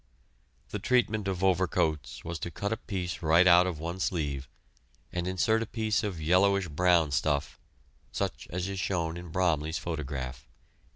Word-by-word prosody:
The 105 - -4
treatment 110 -2 +1
of 95 -1 -2
overcoats 85 -5 +1
was 85 0 -4
to - - -4
cut 100 +5 -2
a - - -3
piece 90 -4 -4
right 85 +2 +5
out 90 0 +7
of 90 -4 -3
one 85 +4 -5
sleeve, 70 -7 -2 0.6
and 90 0 -2
insert 110 +5 +2
a 115 - -3
piece 110 0 0
of 100 -6 -3
yellowish 95 +3 +3
brown 85 0 +3
stuff, 70 +1 0 0.5
such - - -3
as 90 +2 -3
is 100 -1 -4
shown 85 -4 -1
in 85 0 -8
Bromley's 80 -2 0
photograph. 65 -6 -5
90 Hz, 160 wpm, -29 LUFS, 80-95 Hz, 0.6 s, out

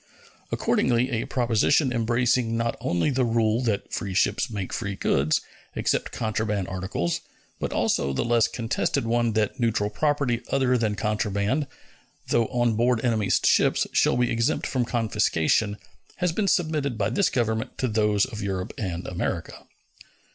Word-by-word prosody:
Accordingly, 125 +2 +1
a 115 -2 -2
proposition 125 +3 +2
embracing 120 0 +1
not 115 0 -1
only 85 - +1
the 130 -1 +1
rule 115 -1 +1
that 110 -5 -2
free 100 -3 -3
ships 130 +6 +1
make 100 -5 -5
free 100 -1 -3
goods, 75 -4 +1 0.3
except - - 0
contraband 105 -4 -2
articles, 95 -2 -2 0.4
but - - -3
also 70 - +1
the 70 - -1
less 120 -1 +3
contested 115 0 -1
one 120 0 +1
that 110 +2 0
neutral 110 -3 0
property 140 -3 0
other 130 -2 +2
than 110 -4 0
contraband, 105 +5 -1 0.6
though 115 -1 +2
on 120 -2 +1
board 120 +2 +1
enemy's 110 -4 +2
ships, - - +3
shall - - +3
be 125 0 +1
exempt 115 0 0
from 125 -3 0
confiscation, 105 -3 +1 0.4
has 180 -1 0
been 200 +4 -1
submitted 155 - 0
by 105 +1 0
this 195 +9 +2
Government 110 -2 -1
to 130 - 0
those 105 -2 +2
of 110 -5 -7
Europe 95 0 -3
and 90 -5 -3
America. 85 -2 -4
115 Hz, 150 wpm, -25 LUFS, 105-125 Hz, 0.6 s, less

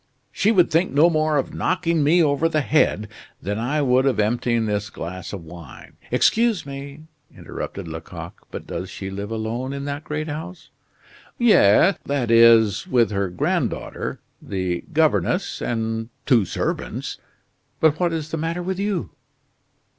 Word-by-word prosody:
She 210 - +2
would 185 -6 +4
think 170 +4 +2
no 160 +5 +5
more 155 -1 +1
of 135 - -2
knocking 170 -4 0
me 165 +4 +4
over 150 +2 +2
the 155 -1 +1
head 135 -8 +2 0.3
than 105 +3 -3
I 145 +6 0
would 130 0 +3
of 125 -5 +1
emptying 115 +1 +1
this 105 -1 -2
glass 90 +2 -7
of 95 -4 -7
wine 80 -5 -12
" - - -23
"Excuse 230 -7 +2
me," 140 +1 -8 0.4
interrupted 95 -3 -6
Lecoq, 80 0 -9
"but - - -7
does 95 - -5
she 95 -1 -6
live 100 +1 -5
alone 115 +4 -3
in 140 0 -5
that 145 +1 -4
great 155 +1 -4
house?" 165 +4 -7 0.7
"Yes 195 - +5
that 135 -5 0
is 115 -3 +5
with 120 -4 +2
her 100 -2 -1
granddaughter, 90 - -2 0.2
the 95 -3 -3
governess, 150 - +1
and 115 -1 -2 0.2
two 120 -7 +4
servants. - - -3 0.6
But 155 -1 +3
what 175 -2 +1
is 160 -1 -4
the 165 - -2
matter 165 +3 -2
with 190 +1 -3
you?" 200 -3 -2
140 Hz, 155 wpm, -22 LUFS, 105-160 Hz, 0.7 s, no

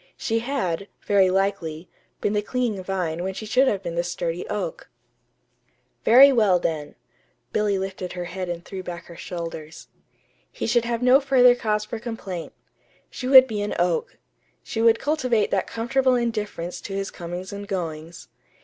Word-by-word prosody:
She 225 -2 0
had, 215 -8 -2 0.2
very 195 -2 +4
likely, 185 -4 -1 0.3
been 205 - 0
the 210 - +1
clinging 225 -4 -2
vine 180 -3 -2
when 190 0 -3
she 215 - -6
should 255 +5 +3
have 200 -5 0
been 170 -2 -4
the 170 +1 0
sturdy 175 0 -3
oak. - - -4 1.1
Very 270 +4 +8
well, 210 -7 +4
then. 160 -4 -3 0.6
(Billy 210 -2 +1
lifted 190 -1 -5
her 180 -1 -4
head 185 +1 -5
and 175 0 -5
threw 190 -1 -6
back 175 -1 -7
her 170 - -12
shoulders.) 165 -3 -7 0.6
He - - -4
should 235 0 +2
have 235 0 -2
no 255 +2 +6
further 260 -3 +5
cause 215 -3 -1
for 225 +1 -6
complaint. 210 -7 -6 0.6
She 255 - -5
would 260 -1 +9
be 215 -5 -3
an 205 - -2
oak. 175 -1 0 0.5
She 225 - -3
would 230 0 +5
cultivate 255 -7 0
that 195 - 0
comfortable 255 +3 +1
indifference 210 -7 -3
to 195 - -6
his 195 0 -3
comings 175 +2 -7
and 200 0 -7
goings. 165 -4 -5
200 Hz, 165 wpm, -24 LUFS, 175-235 Hz, 1.1 s, would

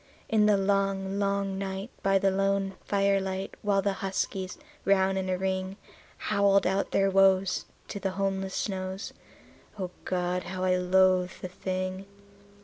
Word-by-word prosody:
In 215 -1 +3
the 210 -1 +5
long, 195 0 0
long 200 -1 0
night, 195 +3 -4
by 195 0 +3
the 195 0 +2
lone 195 0 +1
firelight, 195 -1 0
while 200 -2 +2
the 200 - +1
huskies, 190 -1 -2 0.3
round 190 -1 +3
in 190 0 -3
a 185 - +1
ring, 190 0 -2 0.4
Howled 200 0 +3
out 190 +2 +1
their 195 0 +2
woes 190 -1 +3 0.2
to 200 - -4
the 195 - -1
homeless 195 -1 -1
snows 190 -1 -3 0.6
O 185 -3 -4
God! 180 0 -1
how 185 +1 -4
I 185 0 +3
loathed 185 0 +2
the - - -2
thing. 185 +1 -4
195 Hz, 145 wpm, -28 LUFS, 185-195 Hz, 0.6 s, the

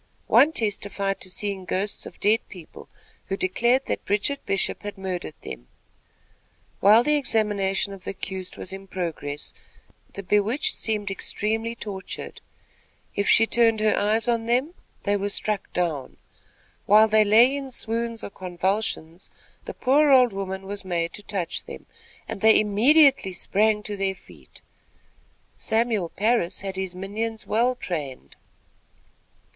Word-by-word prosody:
One 300 - +5
testified 200 -5 -2
to 185 - -5
seeing 195 +1 -3
ghosts 195 +3 -3
of - - -13
dead 215 +2 +3
people, 175 -5 -12 0.4
who 195 - -2
declared 240 +8 +1
that - - -3
Bridget 215 +8 -1
Bishop 195 - 0
had 205 -1 -7
murdered 185 -5 -4
them. - - -9 1.1
While 215 +4 +6
the 300 - +2
examination 205 -6 0
of 190 -2 -11
the - - -5
accused 190 -1 -6
was 185 - -6
in 195 0 -9
progress, 160 -6 -5 0.6
the 200 - -7
bewitched 210 - +2
seemed 210 -3 -1
extremely 225 +4 -2
tortured. 200 -4 -7 0.7
If 200 - 0
she 225 - +6
turned 225 -1 +3
her 215 0 +3
eyes 220 +3 +1
on 230 -1 0
them, 255 +8 +1 0.3
they 205 0 +1
were 200 +1 -2
struck 210 0 -2
down. 160 -7 -2 0.7
While 215 +2 +7
they 215 0 +4
lay 230 +6 +5
in 275 -1 -5
swoons 230 -1 -2
or - - -6
convulsions, 185 -2 -3 0.4
the - - -7
poor 285 +4 +3
old 250 -5 +6
woman 190 0 -5
was 200 +1 -6
made 170 -2 -2
to - - -7
touch 195 -4 -4
them, - - -10 0.4
and - - -6
they 220 0 +6
immediately 245 +1 +4
sprang 210 +3 +1
to 205 0 -4
their 195 -1 -1
feet. - - -17 1.0
Samuel 220 -6 0
Parris 215 -3 0
had 195 -1 -5
his 190 -1 -3
minions 220 +4 -4
well 245 +3 +1
trained. 140 - -6
205 Hz, 145 wpm, -24 LUFS, 190-225 Hz, 1.1 s, While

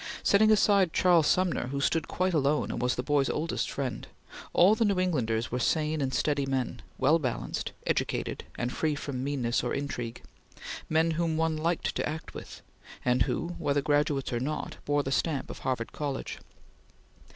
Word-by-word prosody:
Setting 215 +2 +5
aside 200 -4 +4
Charles 175 -4 +4
Sumner, 180 -8 +1
who 140 +2 -3
stood 160 +3 +1
quite 185 0 0
alone 150 -1 +1
and - - -3
was 125 0 +1
the 125 - -2
boy's 140 -1 +2
oldest 165 +2 -1
friend, 135 -3 -4 0.4
all 185 +4 +6
the 220 - +2
New 200 -4 +2
Englanders 120 -10 0
were 125 - -1
sane 155 +3 +1
and 135 -1 0
steady 140 0 0
men, 130 -3 -2 0.2
well 150 +5 +4
balanced, 130 -6 -3
educated, - - -1
and 120 +1 -2
free 155 -2 0
from 135 -3 -4
meanness 130 -4 0
or - - -1
intrigue 120 -5 -4 0.7
men 160 +1 +3
whom 165 0 0
one 160 0 +1
liked 165 +2 -1
to - - -1
act 160 +1 -6
with, - - -9 0.4
and 125 0 +2
who, 170 - -2
whether 145 -3 +1
graduates 145 -3 +1
or 120 - 0
not, 145 +5 -3
bore 145 0 +1
the 135 - -3
stamp 145 -1 0
of - - -9
Harvard 125 -3 -2
College. 145 -3 -4
145 Hz, 175 wpm, -29 LUFS, 130-165 Hz, 0.7 s, all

